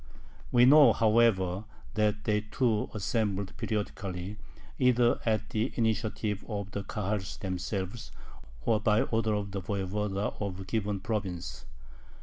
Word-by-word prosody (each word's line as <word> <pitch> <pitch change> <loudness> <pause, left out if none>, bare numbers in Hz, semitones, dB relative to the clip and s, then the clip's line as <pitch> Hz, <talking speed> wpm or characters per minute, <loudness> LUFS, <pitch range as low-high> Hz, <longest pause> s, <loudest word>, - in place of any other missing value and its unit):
We 120 0 +6
know, 145 +2 +8
however, 110 -4 +3 0.3
that 105 -1 +1
they 105 -1 +1
too 110 0 0
assembled 100 -2 -1
periodically, 100 -3 -3 0.4
either 125 -2 +4
at 110 -1 0
the 110 +4 0
initiative 110 -2 -1
of 100 -3 -4
the 100 - -4
Kahals 105 -2 -3
themselves 95 +3 -4 0.5
or 110 -2 +3
by 105 0 +3
order 110 -1 0
of 100 -1 -3
the 95 0 -3
voyevoda 100 +1 -2
of 95 -2 -3
a - - -5
given 100 -1 -2
province. 90 - -4
105 Hz, 130 wpm, -30 LUFS, 95-110 Hz, 0.5 s, know